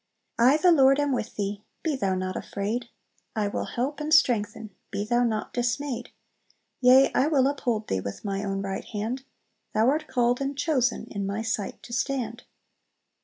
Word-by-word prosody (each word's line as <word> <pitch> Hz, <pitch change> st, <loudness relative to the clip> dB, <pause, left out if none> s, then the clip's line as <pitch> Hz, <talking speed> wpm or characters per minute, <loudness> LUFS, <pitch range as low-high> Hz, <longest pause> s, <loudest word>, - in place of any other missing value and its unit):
"I 255 Hz, +5 st, +6 dB
the 355 Hz, +3 st, +5 dB
Lord 275 Hz, -3 st, +5 dB
am 290 Hz, -1 st, +1 dB
with 245 Hz, -4 st, -2 dB
thee, 205 Hz, 0 st, -3 dB, 0.2 s
Be 315 Hz, -3 st, 0 dB
thou 195 Hz, -7 st, 0 dB
not 185 Hz, 0 st, -3 dB
afraid! 225 Hz, +4 st, -3 dB, 0.5 s
I 210 Hz, -2 st, +1 dB
will 200 Hz, -, -2 dB
help 270 Hz, +4 st, -3 dB
and 300 Hz, +1 st, -3 dB
strengthen, 220 Hz, -7 st, +3 dB, 0.2 s
Be 205 Hz, -, -3 dB
thou 240 Hz, +2 st, +2 dB
not 220 Hz, -3 st, -1 dB
dismayed! 245 Hz, +1 st, -2 dB, 0.7 s
Yea, 260 Hz, +2 st, +6 dB
I 270 Hz, -, +3 dB
will 280 Hz, -4 st, +3 dB
uphold 245 Hz, -6 st, -1 dB
thee 95 Hz, -, -1 dB
With 100 Hz, -, -7 dB
my 195 Hz, 0 st, -2 dB
own 195 Hz, -1 st, -2 dB
right 195 Hz, -1 st, -3 dB
hand; 230 Hz, +5 st, -4 dB, 0.5 s
Thou 220 Hz, +3 st, +4 dB
art 305 Hz, +1 st, -1 dB
called 245 Hz, +1 st, +1 dB
and 275 Hz, 0 st, -2 dB
chosen 265 Hz, -6 st, +1 dB
In 200 Hz, -2 st, -3 dB
my 200 Hz, +3 st, -2 dB
sight 225 Hz, -3 st, -3 dB
to 235 Hz, -, -9 dB
stand!" 240 Hz, -2 st, -2 dB
240 Hz, 175 wpm, -26 LUFS, 210-270 Hz, 0.7 s, I